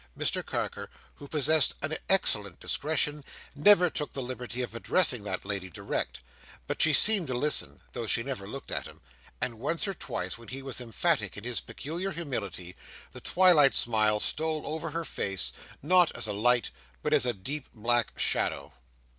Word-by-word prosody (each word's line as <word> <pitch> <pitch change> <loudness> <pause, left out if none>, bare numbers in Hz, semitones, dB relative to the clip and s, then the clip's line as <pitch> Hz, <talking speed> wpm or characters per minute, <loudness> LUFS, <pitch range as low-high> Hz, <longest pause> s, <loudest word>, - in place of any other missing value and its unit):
Mr - - +1
Carker, - - -4 0.2
who 145 - -12
possessed 150 0 +3
an 155 +2 -1
excellent 105 - +2
discretion, 150 -1 -1 0.3
never 180 +4 +6
took 150 -3 -3
the 135 - -3
liberty 125 0 -5
of 120 - -6
addressing 125 - +2
that 95 -2 -4
lady, 100 -2 -4
direct; 85 - -4 0.4
but - - -2
she 155 - +5
seemed 195 +2 +6
to 130 - -2
listen, 150 +4 0
though 120 -2 -4
she 115 - +2
never 125 -7 -5
looked 135 +6 -8
at - - -3
him; - - -15 0.4
and 115 -3 -2
once 165 - -1
or 195 - -2
twice, 95 - -4
when 115 - -14
he 135 +1 -7
was 135 -2 -5
emphatic 115 -4 -1
in 100 - -7
his 120 -1 -1
peculiar 170 +6 -4
humility, 110 - -4 0.4
the - - -11
twilight 175 -7 +5
smile 110 -2 +3
stole 155 +5 0
over 160 +2 -4
her 165 +2 -3
face, 90 - -2 0.3
not 180 +2 +4
as - - -2
a 105 - -2
light, 125 +4 +2 0.3
but 150 - 0
as 140 -4 +4
a - - +3
deep 135 +9 -4
black 120 +1 +1
shadow. - - -1
135 Hz, 175 wpm, -29 LUFS, 110-155 Hz, 0.4 s, never